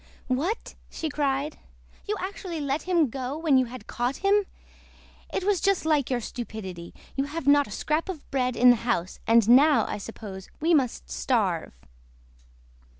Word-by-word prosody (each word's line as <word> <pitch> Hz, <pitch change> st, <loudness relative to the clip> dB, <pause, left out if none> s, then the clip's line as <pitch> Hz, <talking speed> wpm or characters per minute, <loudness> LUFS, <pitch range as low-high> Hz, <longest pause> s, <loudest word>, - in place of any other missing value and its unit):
"What!" 315 Hz, -, -1 dB, 0.2 s
she 320 Hz, -, -4 dB
cried, 285 Hz, 0 st, -1 dB, 0.5 s
"you 420 Hz, -, 0 dB
actually 370 Hz, -3 st, -5 dB
let 285 Hz, +1 st, -1 dB
him 335 Hz, -8 st, +2 dB
go 265 Hz, +2 st, -4 dB
when 310 Hz, -5 st, +3 dB
you 255 Hz, -, +2 dB
had 250 Hz, +1 st, -9 dB
caught 245 Hz, +3 st, -2 dB
him? 405 Hz, 0 st, +4 dB, 0.8 s
It 385 Hz, -, -2 dB
was 390 Hz, -2 st, +1 dB
just 395 Hz, -4 st, +2 dB
like 300 Hz, -5 st, +2 dB
your 250 Hz, -2 st, 0 dB
stupidity. 195 Hz, -8 st, -7 dB, 0.2 s
We 275 Hz, +1 st, 0 dB
have 305 Hz, 0 st, -5 dB
not 285 Hz, 0 st, +5 dB
a -, -, -11 dB
scrap 310 Hz, -, -1 dB
of 330 Hz, -6 st, -6 dB
bread 255 Hz, -2 st, 0 dB
in 250 Hz, +1 st, +7 dB
the 245 Hz, -, +3 dB
house, 225 Hz, -6 st, -2 dB
and 230 Hz, -1 st, +5 dB
now, 280 Hz, +5 st, +6 dB
I -, -, -4 dB
suppose, 200 Hz, -3 st, -8 dB
we 330 Hz, +3 st, +2 dB
must 265 Hz, -6 st, 0 dB
starve!" 190 Hz, -, 0 dB
275 Hz, 165 wpm, -26 LUFS, 240-320 Hz, 0.8 s, in